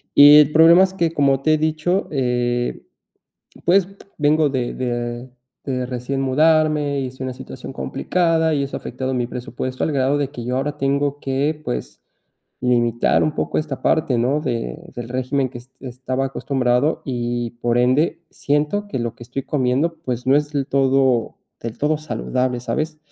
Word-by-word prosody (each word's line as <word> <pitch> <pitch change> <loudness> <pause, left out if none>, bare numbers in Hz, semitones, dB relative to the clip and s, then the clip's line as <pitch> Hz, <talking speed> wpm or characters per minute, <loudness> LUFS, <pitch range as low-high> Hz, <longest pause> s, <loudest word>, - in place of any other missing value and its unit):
Y 145 +1 +9
el 150 0 +5
problema 165 +4 +7
es 190 0 0
que 170 -3 0
como 135 -3 +2
te 155 +2 +3
he - - 0
dicho, 160 +5 0
eh, 120 -2 -1 0.8
pues, 185 +1 +4 0.3
vengo 150 +1 +3
de 130 -3 -2
de 120 0 -4 0.3
de 125 -2 -2
recién 125 +2 -3
mudarme 150 +1 +2
y 130 - -2
estoy 130 +1 -8
en - - -2
una 125 - -5
situación 130 +1 -9
complicada 165 +1 0
y 140 - 0
eso 140 - -4
ha - - -6
afectado 130 0 -4
mi 120 -1 0
presupuesto, 125 +1 -5
al - - -1
grado 135 +1 +1
de 140 -2 -1
que 120 -5 -8
yo 125 +1 -2
ahora 145 +2 -2
tengo 140 +1 0
que, 140 +3 -1
pues, 60 0 -5 0.6
limitar 120 -2 +2
un 155 - -1
poco - - -1
esta 150 -3 -4
parte, 145 -6 +2
¿no?, 135 +6 +1
de 115 - -3 0.2
del 120 -1 -6
régimen 130 +1 -1
que 120 - -8
est 125 +2 -16
estaba 130 +1 -3
acostumbrado 135 +1 0
y 120 -2 -2
por 120 0 +1
ende, 145 +7 +2
siento 150 +9 -1
que 130 - -3
lo 115 -1 -3
que - - -14
estoy 130 +3 -5
comiendo, 145 +4 0
pues, 125 0 -3
no 135 +2 +5
es 150 0 -1
del 140 -2 -1
todo 135 -4 +2 0.2
del 115 -1 -6
todo 150 +1 +1
saludable, 130 -5 -2
¿sabes? 155 +4 -3
135 Hz, 180 wpm, -20 LUFS, 125-150 Hz, 0.8 s, Y